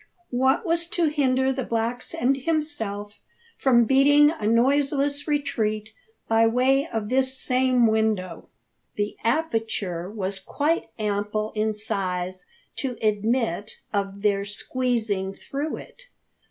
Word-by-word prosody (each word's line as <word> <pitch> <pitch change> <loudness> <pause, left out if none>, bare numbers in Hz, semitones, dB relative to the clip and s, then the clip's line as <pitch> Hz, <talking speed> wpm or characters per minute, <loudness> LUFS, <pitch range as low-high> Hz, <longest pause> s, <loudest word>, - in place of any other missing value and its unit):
What 265 - +2
was 335 0 +2
to 340 -2 +1
hinder 265 -3 +2
the 260 0 -3
blacks 230 +2 -2
and 260 +3 +2
himself 260 -9 -3 0.4
from 240 -3 +4
beating 290 +4 +5
a 315 -10 -3
noiseless 280 +5 +2
retreat 220 -7 -1 0.4
by 225 0 +4
way 265 +5 +2
of 215 -2 -3
this 260 +1 +1
same 255 -2 +2
window? 220 -6 0 0.5
The 205 0 -2
aperture 225 - -1
was 195 -2 -3
quite 300 - -1
ample 210 0 -1
in 215 0 0
size 185 -3 -2 0.3
to 255 -4 -3
admit 215 -1 0 0.2
of 200 0 -2
their 200 -1 +2
squeezing 210 -2 -2
through 290 +3 -4
it. - - -13
230 Hz, 120 wpm, -25 LUFS, 210-270 Hz, 0.5 s, beating